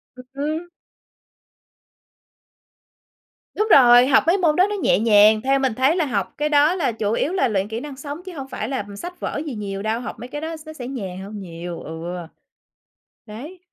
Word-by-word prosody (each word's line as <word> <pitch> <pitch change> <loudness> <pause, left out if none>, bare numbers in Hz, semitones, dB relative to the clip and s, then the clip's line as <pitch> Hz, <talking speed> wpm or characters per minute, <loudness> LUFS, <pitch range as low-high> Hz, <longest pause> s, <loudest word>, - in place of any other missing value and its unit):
Ừ 255 - -10
hứm 310 +5 -3 2.9
Đúng 425 - 0
rồi, 245 -1 +8
học 270 - +5
mấy 345 +4 +4
môn 330 -5 +2
đó 370 +4 +4
nó 415 - -2
nhẹ 390 - +2
nhàng, 215 -1 +5
theo 270 +2 +2
mình 265 -3 0
thấy 260 +7 +2
là 345 -4 +1
học 200 -8 -2
cái 300 +1 0
đó 300 +3 +4
là 310 -9 0
chủ 215 -2 -2
yếu 295 +8 0
là 325 -9 +2
luyện 200 -3 -1
kỹ 220 +1 -4
năng 285 +1 -8
sống 285 +4 -7
chứ 370 - -8
hông 270 -3 -6
phải - - -5
là 260 -7 -3
sách 355 - -8
vở 285 - -3
gì 285 -6 -5
nhiều 200 -2 -5
đâu, 220 +2 -1
học 245 -1 -7
mấy 245 - -7
cái 295 +3 -6
đó 325 +1 -4
nó 315 - -9
sẽ 250 -5 -7
nhàn 195 -9 -6
hơn 205 +2 -8
nhiều. 170 -2 -7
Ừ. 160 +1 -8 1.2
Đấy. 265 - -9
260 Hz, 200 wpm, -22 LUFS, 215-305 Hz, 2.9 s, rồi